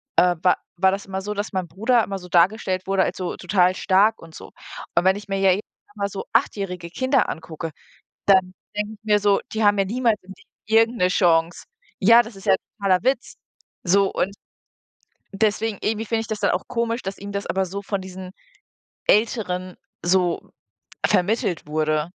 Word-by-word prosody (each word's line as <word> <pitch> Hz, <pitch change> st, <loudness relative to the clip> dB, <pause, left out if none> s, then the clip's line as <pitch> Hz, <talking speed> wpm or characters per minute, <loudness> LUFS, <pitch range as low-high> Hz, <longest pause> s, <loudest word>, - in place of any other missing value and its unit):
äh, 180 Hz, -1 st, +4 dB
wa 180 Hz, -, +4 dB, 0.2 s
war 190 Hz, +1 st, +4 dB
das 195 Hz, +1 st, -4 dB
immer 190 Hz, 0 st, -4 dB
so, 210 Hz, +2 st, -4 dB
dass 205 Hz, +2 st, -4 dB
mein 185 Hz, -2 st, -2 dB
Bruder 225 Hz, +5 st, +2 dB
immer 195 Hz, -1 st, -4 dB
so 180 Hz, 0 st, -12 dB
dargestellt 185 Hz, +1 st, +2 dB
wurde 195 Hz, -1 st, +2 dB
als -, -, -3 dB
so 180 Hz, -2 st, -3 dB
total 185 Hz, -2 st, +2 dB
stark 205 Hz, +4 st, +3 dB
und 165 Hz, -1 st, -13 dB
so. -, -, -11 dB, 0.4 s
Und 170 Hz, -, +3 dB
wenn 190 Hz, +1 st, +5 dB
ich 205 Hz, 0 st, -10 dB
mir 195 Hz, 0 st, -1 dB
ja 195 Hz, -1 st, +5 dB
jetzt 200 Hz, +4 st, 0 dB, 0.3 s
mal 200 Hz, -1 st, -1 dB
so 195 Hz, -, -5 dB
achtjährige 180 Hz, -4 st, -1 dB
Kinder 260 Hz, -, +1 dB
angucke, 160 Hz, 0 st, -6 dB, 0.6 s
dann 190 Hz, -2 st, +4 dB, 0.2 s
denke 210 Hz, +1 st, -2 dB
ich 215 Hz, 0 st, -18 dB
mir 210 Hz, -1 st, +3 dB
so: 205 Hz, -1 st, +3 dB
„Die 220 Hz, 0 st, 0 dB
haben 205 Hz, 0 st, +4 dB
ja 195 Hz, -, +3 dB
niemals 230 Hz, +1 st, +1 dB
im 190 Hz, +1 st, -12 dB
Leben -, -, -24 dB, 0.3 s
irgend 235 Hz, +1 st, 0 dB
'ne 180 Hz, -, +4 dB
Chance.“ 170 Hz, -2 st, +2 dB, 0.4 s
Ja, 230 Hz, +4 st, +7 dB
das 225 Hz, -1 st, -11 dB
ist 195 Hz, -, -13 dB
ja -, -, +5 dB
'n -, -, +3 dB, 0.2 s
totaler 195 Hz, -1 st, +2 dB
Witz! 260 Hz, -1 st, 0 dB, 0.5 s
So, 195 Hz, +2 st, +3 dB
und 200 Hz, +2 st, -2 dB, 1.0 s
deswegen 215 Hz, 0 st, 0 dB
irgendwie 220 Hz, +1 st, -1 dB
finde 225 Hz, 0 st, 0 dB
ich -, -, -8 dB
das 220 Hz, -2 st, -4 dB
dann -, -, +2 dB
auch -, -, -2 dB
komisch, 235 Hz, 0 st, -2 dB
dass 195 Hz, +1 st, -5 dB
ihm 200 Hz, +1 st, -7 dB
das 200 Hz, 0 st, -3 dB
aber 190 Hz, 0 st, 0 dB
so 200 Hz, +3 st, -6 dB
von 200 Hz, -1 st, -3 dB
diesen 185 Hz, 0 st, -9 dB, 0.8 s
Älteren 185 Hz, -5 st, +1 dB, 0.3 s
so 175 Hz, -1 st, +1 dB, 0.5 s
vermittelt 185 Hz, -3 st, +1 dB
wurde. 155 Hz, 0 st, 0 dB
195 Hz, 195 wpm, -23 LUFS, 180-215 Hz, 1.0 s, Ja